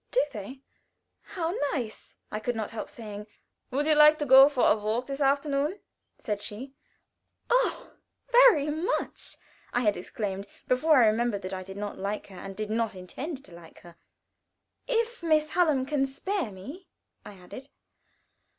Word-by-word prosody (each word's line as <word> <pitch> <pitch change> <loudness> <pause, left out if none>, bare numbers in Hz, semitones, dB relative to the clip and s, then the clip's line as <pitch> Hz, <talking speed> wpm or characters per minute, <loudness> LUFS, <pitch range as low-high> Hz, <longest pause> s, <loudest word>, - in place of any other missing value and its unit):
"Do - - +3
they? 240 +5 -8 0.6
How 335 -4 -3 0.2
nice!" 235 -6 -5 0.2
I 215 - -3
could 245 +2 -2
not 220 -1 -4
help 225 - -6
saying. 210 -2 -8 0.4
"Would 280 +3 -1
you 310 - +4
like 300 0 +7
to 295 - -2
go 270 +1 +9
for 270 -4 +2
a - - +5
walk 220 +3 -2
this 275 +1 -5
afternoon?" 280 +5 +1 0.4
said 210 -2 -3
she. 235 +7 -7 0.8
"Oh, - - +1 0.4
very 475 - +6
much!" 320 +5 -3 0.3
I 245 - +1
had 210 -4 +2
exclaimed, 195 +1 -5 0.2
before 295 +4 +4
I 245 - +7
remembered 220 -2 +1
that 185 +1 -5
I 185 - -4
did 190 +1 -9
not 205 0 -5
like 200 +2 -3
her, 190 - -12
and 195 +2 -8
did 215 +1 -4
not 225 -2 -1
intend 265 - -7
to 180 - -13
like 170 -1 -14
her. 170 -1 -15 0.9
"If 470 -2 0
Miss 310 -2 +2
Hallam 305 -7 +2
can 275 -1 0
spare 340 - -3
me," 275 - -10 0.4
I 205 - -11
added. 195 +9 -11
255 Hz, 165 wpm, -28 LUFS, 210-300 Hz, 0.9 s, go